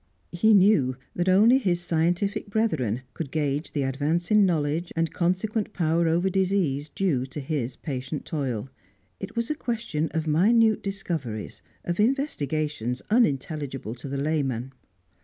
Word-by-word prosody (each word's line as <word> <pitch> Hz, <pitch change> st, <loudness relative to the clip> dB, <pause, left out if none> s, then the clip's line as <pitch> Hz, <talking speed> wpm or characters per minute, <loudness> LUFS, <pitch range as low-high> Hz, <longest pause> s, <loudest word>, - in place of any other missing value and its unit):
He 215 Hz, +5 st, +4 dB
knew 185 Hz, -10 st, +4 dB, 0.2 s
that 175 Hz, +1 st, +1 dB
only 220 Hz, +8 st, +6 dB
his 180 Hz, -8 st, +1 dB
scientific 175 Hz, +4 st, 0 dB
brethren 130 Hz, -, 0 dB
could 160 Hz, -5 st, -5 dB
gauge 145 Hz, 0 st, -1 dB
the 145 Hz, -, 0 dB
advance 150 Hz, +8 st, -1 dB
in 210 Hz, -2 st, +6 dB
knowledge, 160 Hz, 0 st, -1 dB
and 165 Hz, 0 st, 0 dB
consequent 205 Hz, +5 st, -1 dB
power 165 Hz, -1 st, +1 dB
over 170 Hz, +3 st, +2 dB
disease, 185 Hz, -7 st, 0 dB
due 145 Hz, -7 st, 0 dB
to 135 Hz, +3 st, -7 dB
his 135 Hz, -4 st, -3 dB
patient 135 Hz, 0 st, -5 dB
toil; 130 Hz, -5 st, -3 dB, 0.5 s
it 195 Hz, -, -7 dB
was 235 Hz, +3 st, -1 dB
a -, -, +2 dB
question 230 Hz, -, -2 dB
of 160 Hz, -1 st, -2 dB
minute 215 Hz, +8 st, +4 dB
discoveries, 165 Hz, -, -4 dB, 0.2 s
of 175 Hz, +2 st, -2 dB
investigations 155 Hz, -, -1 dB
unintelligible 145 Hz, -, 0 dB
to 125 Hz, +3 st, -9 dB
the 140 Hz, -, -3 dB
layman. 135 Hz, -4 st, -1 dB
160 Hz, 140 wpm, -26 LUFS, 140-195 Hz, 0.5 s, only